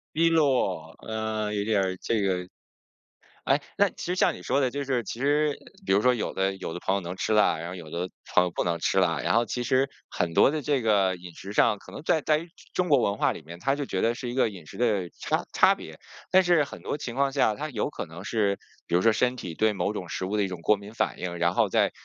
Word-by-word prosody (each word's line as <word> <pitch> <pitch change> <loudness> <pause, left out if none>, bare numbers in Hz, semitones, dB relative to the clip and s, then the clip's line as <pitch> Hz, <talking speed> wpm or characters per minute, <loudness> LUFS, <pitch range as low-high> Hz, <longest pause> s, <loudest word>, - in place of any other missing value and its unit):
逼 165 +1 +4
落， 125 - +1
呃， 110 -1 -2
有 100 -1 0
点 105 -2 +2
儿 95 -1 -1
这 110 -3 0
个， 90 -2 0 1.0
哎， - - +3 0.2
那 - - +4
其 - - -10
实 180 - -1
像 185 - +3
你 - - -10
说 140 - +1
的 130 -2 +2
就 140 +2 -3
是 130 -3 0
其 115 +2 -6
实， 145 +2 +2 0.3
比 - - +1
如 100 - +5
说 125 +3 +4
有 115 - -2
的 95 0 0
有 95 - -6
的 - - -5
朋 95 - 0
友 100 - 0
能 90 0 -6
吃 110 - -1
辣， 105 -6 +4
然 85 +1 -5
后 90 - -6
有 85 -4 -9
的 90 +3 -3 0.2
朋 90 - +5
友 90 - -2
不 - - 0
能 85 -1 -1
吃 95 - +1
辣， 90 -3 +2
然 - - 0
后 120 0 +4
其 120 +2 -3
实 130 +2 +2 0.2
很 85 -2 -1
多 - - +6
的 155 -2 -2
这 145 -2 +1
个 100 -4 +2
饮 90 -1 -11
食 100 - -8
上， 105 - +4
可 - - -14
能 - - -8
在 160 - +3
在 155 +3 +1 0.3
中 180 -1 0
国 140 -4 +5
文 100 -3 +1
化 - - +2
里 - - -9
面， 85 +2 -10
他 135 +8 +1
就 145 -1 -3
觉 95 - -2
得 115 +1 +2
是 120 0 -5
一 - - -5
个 130 -3 +3
饮 95 -6 -10
食 - - -12
的 105 -7 +1
差 - - 0
差 - - +5
别。 - - -11 0.3
但 190 0 +5
是 175 -4 +4
很 140 - -7
多 - - -2
情 125 -5 -6
况 135 0 +2
下， 110 -6 +2
他 155 +2 -4
有 120 0 -2
可 140 - -6
能 80 +3 -10
是， 100 -2 0 0.3
比 - - -3
如 90 - +4
说 115 - +6
身 125 +3 +1
体 90 -9 -6
对 110 -1 +3
某 100 +1 -1
种 90 -4 -6
食 95 - -3
物 100 +3 -1
的 105 - +2
一 - - 0
种 90 -3 -6
过 105 - +4
敏 100 +2 -11
反 - - -1
应， 90 -1 -4
然 85 0 +2
后 - - +2
在 - - +2
105 Hz, 295 characters per minute, -27 LUFS, 95-130 Hz, 1.0 s, 多